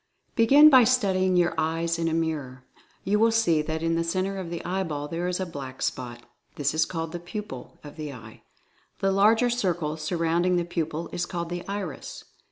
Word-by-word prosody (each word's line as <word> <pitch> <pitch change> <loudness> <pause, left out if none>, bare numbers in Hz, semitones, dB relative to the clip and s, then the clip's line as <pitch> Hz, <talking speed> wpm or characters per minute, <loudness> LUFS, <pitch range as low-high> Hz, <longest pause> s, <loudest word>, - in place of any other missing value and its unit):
Begin 275 +7 +7
by 260 -2 +8
studying 190 -7 +2
your 175 -1 +3
eyes 165 +1 0
in 165 - 0
a 160 - 0
mirror. 145 -6 -3 0.4
You 210 +2 +1
will 225 +1 +5
see 215 -9 +3
that 160 +1 -4
in 165 0 +1
the 165 0 +1
center 185 +3 -1
of 180 -3 -5
the 170 -1 -6
eyeball 165 -6 -2
there 170 +3 -3
is 180 0 -1
a 190 - -1
black 135 -6 -7
spot; 120 -1 -4 0.3
this 145 0 0
is 155 0 +2
called 165 -2 -4
the 175 - -5
"Pupil" 175 - -8
of 145 +1 -11
the 150 -2 -5
eye. 115 -4 -12 0.6
The 195 - +1
larger 220 +5 +4
circle 175 -9 -1
surrounding 170 +2 0
the 175 -1 0
Pupil 165 -1 -3
is 175 - -2
called 170 -1 -4
the 175 0 -4
"Iris." 195 -7 -6
170 Hz, 195 wpm, -26 LUFS, 155-190 Hz, 0.6 s, by